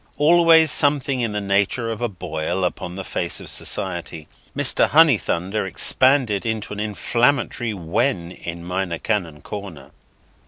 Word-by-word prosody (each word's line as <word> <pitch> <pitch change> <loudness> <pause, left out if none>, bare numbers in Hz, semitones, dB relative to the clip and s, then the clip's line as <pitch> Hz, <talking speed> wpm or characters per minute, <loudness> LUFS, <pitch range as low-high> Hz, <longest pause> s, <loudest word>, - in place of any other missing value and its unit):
Always 165 0 +5
something 140 -3 +2
in 115 -2 -1
the 105 - -2
nature 100 +4 0
of 110 - -6
a 120 - -1
Boil 85 0 -4
upon 90 0 -5
the 95 - -6
face 85 -2 -2
of - - -9
society, 85 -4 -1 0.3
Mr. - - +3
Honeythunder 110 - +2
expanded 120 +3 +3
into 110 -2 -4
an 105 - -7
inflammatory 120 +2 -1
Wen 90 +1 -2
in 85 -1 -8
Minor 90 -1 -3
Canon 85 -7 -3
Corner. 90 -10 -9
105 Hz, 135 wpm, -21 LUFS, 90-125 Hz, 0.3 s, Always